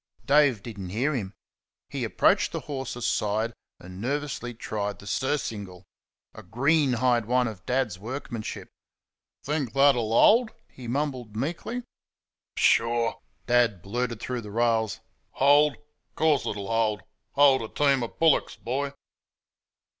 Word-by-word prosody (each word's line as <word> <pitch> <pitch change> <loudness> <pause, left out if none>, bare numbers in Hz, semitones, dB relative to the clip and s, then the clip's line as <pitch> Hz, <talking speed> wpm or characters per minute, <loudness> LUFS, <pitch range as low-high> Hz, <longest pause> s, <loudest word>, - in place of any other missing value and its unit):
Dave 140 -7 +4
did 110 -4 -8
n't 95 -2 -6
hear 135 +8 0
him. 100 -8 -3 0.6
He - - -4
approached - - +2
the - - -4
horse's 130 -4 -5
side 110 +2 0 0.3
and 90 +2 -10
nervously 135 -2 -3
tried 105 -2 -4
the - - -14
surcingle 100 - -3 0.5
a - - -10
greenhide 125 -3 +2
one 125 +1 +2
of 105 -4 -8
Dad's 125 -8 0
workmanship. 120 0 -6 0.8
"Think 145 -5 -2
that'll 135 -5 +4
hold?" 220 - +5 0.2
he 125 -2 -11
mumbled 130 -4 -3
meekly. 170 - -3 0.7
"Pshaw!" 115 0 +2 0.3
Dad 120 -7 +2
blurted 115 +2 -3
through 125 +1 -4
the 105 - -9
rails 110 0 0 0.3
"Hold! 145 +2 +5
Of 150 0 -35
course 155 -4 +2
it'll 100 -1 -4
hold 110 -4 +1 0.3
hold 140 -2 +5
a 110 - -4
team 140 +1 +2
o' 120 - -1
bullocks, 160 +4 +2
boy." 140 +4 -3
120 Hz, 130 wpm, -26 LUFS, 110-140 Hz, 0.8 s, hold